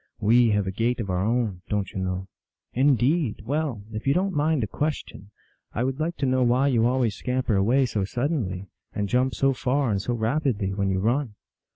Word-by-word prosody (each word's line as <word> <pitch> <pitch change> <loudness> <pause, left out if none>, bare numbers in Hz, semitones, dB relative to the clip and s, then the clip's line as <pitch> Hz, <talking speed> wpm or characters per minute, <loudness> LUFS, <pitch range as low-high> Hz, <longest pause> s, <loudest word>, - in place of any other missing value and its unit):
We 115 +3 +4
have 105 -2 +1
a 95 - -2
gait 115 +5 0
of 100 -5 -2
our 90 +1 0
own, 110 -4 0
don 105 -1 0
t - - -12
you - - -3
know? 95 0 -3
" - - -67
" - - -55
Indeed! 140 -1 +2
Well, 140 -5 -2
if 110 +4 -5
you 140 - +3
don 195 +2 +1
t - - -8
mind 150 -2 +1
a - - -1
question, 145 -8 -4 0.4
I 120 - -1
would 135 +2 -2
like 165 +2 -2
to 140 - 0
know 130 0 +2
why 125 +3 +3
you 115 -3 +3
always 125 -3 +1
scamper 125 -1 -1
away 120 +8 +3
so 110 -5 -1
suddenly, 110 - -2 0.3
and 105 -1 -1
jump 125 +5 +1
so 135 0 +2
far 130 0 0
and 100 -2 0
so 120 +4 -2
rapidly 115 -4 0
when 100 0 0
you 95 0 0
run." 120 +1 0
120 Hz, 225 wpm, -25 LUFS, 105-135 Hz, 0.4 s, We